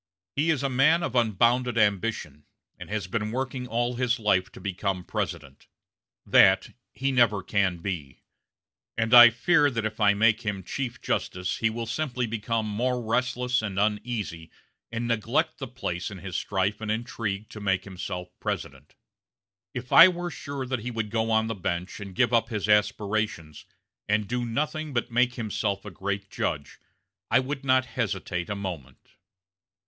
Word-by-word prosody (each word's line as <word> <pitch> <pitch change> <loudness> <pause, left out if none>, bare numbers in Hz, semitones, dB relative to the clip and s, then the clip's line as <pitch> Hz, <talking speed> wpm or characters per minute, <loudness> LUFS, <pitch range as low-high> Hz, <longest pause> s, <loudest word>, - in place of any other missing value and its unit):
He 150 +4 +1
is 150 -4 +1
a - - +2
man 145 +6 +3
of 140 - -2
unbounded 120 +1 +2
ambition, 100 -8 0 0.3
and - - -9
has 105 -3 -2
been 105 +3 -2
working 130 0 -3
all 120 +1 -1
his 125 -1 +1
life 100 -4 +1
to - - -11
become 95 -1 -2
President. 70 -5 -5 0.6
That 95 0 +5 0.2
he 135 +1 -2
can - - -3
never 105 -5 +4
be; 90 -8 -2 0.7
and 115 +1 0
I 120 -1 +11
fear 145 +6 +3
that 115 -4 -2
if 110 +1 -4
I 100 -1 +4
make 110 +1 +3
him 100 -3 -3
chief 125 +6 -4
justice 90 0 -2
he 115 - +2
will 115 +1 -4
simply 125 0 -2
become 110 0 -2
more 125 +4 -1
restless 125 +2 0
and 100 -3 -4
uneasy 105 -5 -2 0.4
and 120 +1 -3
neglect 115 -3 0
the - - -4
place 90 +1 -4
in 100 - -8
his 90 0 -7
strife 100 +2 -1
and 110 - -4
intrigue 110 -2 -3
to 110 - -9
make 95 -2 +1
himself 90 -1 -6
President. 70 +2 -5 0.8
If 125 0 -5
I 170 - +11
were 175 -1 -3
sure 140 -4 -5
that 130 -1 -2
he 120 +3 -5
would 110 -3 -3
go 115 0 0
on 110 0 +3
the 115 - -2
bench 90 -2 -3
and 100 -3 -8
give 125 +3 +2
up 115 -1 +3
his 105 -3 -2
aspirations, 105 -6 0 0.4
and 105 0 +1
do 125 +2 -2
nothing 150 +5 -2
but 120 0 -1
make 125 +1 +2
himself 105 -3 -2
a 105 - -7
great 100 +2 -4
judge, 70 -4 -3 0.5
I - - +5
would 135 +2 -4
not 130 -1 +3
hesitate 95 -7 -3
a 100 - -2
moment." 85 -10 -6
110 Hz, 170 wpm, -26 LUFS, 100-125 Hz, 0.8 s, I